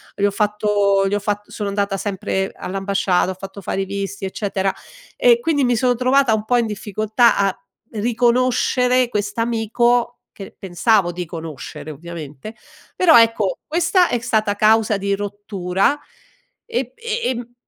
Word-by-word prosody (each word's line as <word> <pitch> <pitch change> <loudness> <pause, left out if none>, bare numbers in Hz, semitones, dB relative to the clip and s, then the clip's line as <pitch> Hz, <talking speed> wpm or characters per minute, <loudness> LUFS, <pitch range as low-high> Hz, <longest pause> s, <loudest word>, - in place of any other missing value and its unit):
gli 200 - +1
ho 205 - +2
fatto 205 -1 +1
gli 195 - -2
ho - - 0
fatt 205 0 -3
sono 205 -2 -4
andata 200 0 -1
sempre 190 -1 -2
all'ambasciata, 195 -1 0
ho - - -7
fatto 195 +1 -9
fare 195 +1 -2
i - - -2
visti, 200 0 -5
eccetera, 195 0 -2 0.4
e 480 -1 +5
quindi 300 - +1
mi 245 -1 +2
sono 245 +1 +2
trovata 255 -1 +3
un 215 0 -1
po' 245 +2 +2
in 235 - +2
difficoltà 215 +3 +1
a 195 -1 +1 0.4
riconoscere 250 +2 +2
quest'amico, 230 +3 0 0.3
che 195 - -10
pensavo 190 0 +1
di 180 0 -4
conoscere 160 -2 -8
ovviamente, 160 +4 -9 0.4
però 325 -8 +6
ecco, 225 -4 +1
questa 350 +3 +2
è - - +1
stata 215 -2 0
causa 215 0 +3
di 200 0 -1
rottura, 200 -2 -1 0.7
ehm, 465 - -1
e 465 +1 -4
ehm, 240 -1 -3
210 Hz, 150 wpm, -20 LUFS, 195-240 Hz, 0.7 s, però